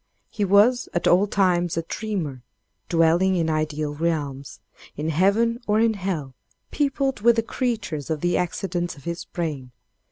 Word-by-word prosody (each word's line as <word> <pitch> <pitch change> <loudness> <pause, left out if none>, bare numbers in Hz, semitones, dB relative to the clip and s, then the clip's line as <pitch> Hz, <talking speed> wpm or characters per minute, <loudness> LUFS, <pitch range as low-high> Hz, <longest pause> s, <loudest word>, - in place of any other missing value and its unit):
"He 210 - -2
was 210 +6 +4
at 175 - +1
all 190 +4 +4
times 175 -4 +1
a 165 - 0
dreamer 170 - -4 0.5
dwelling 170 +3 +3
in 165 -2 +1
ideal 155 -1 -2
realms 145 -5 -3 0.4
in 155 +2 -2
heaven 200 +8 +2
or 210 +1 +3
hell 190 - -1 0.4
peopled 275 -4 0
with 235 +1 +5
the 225 - +1
creatures 220 - -3
and 160 -1 -1
the 175 +2 0
accidents 175 0 -2
of 140 - -15
his 170 0 -5
brain. 150 -7 -4
175 Hz, 150 wpm, -24 LUFS, 155-210 Hz, 0.5 s, with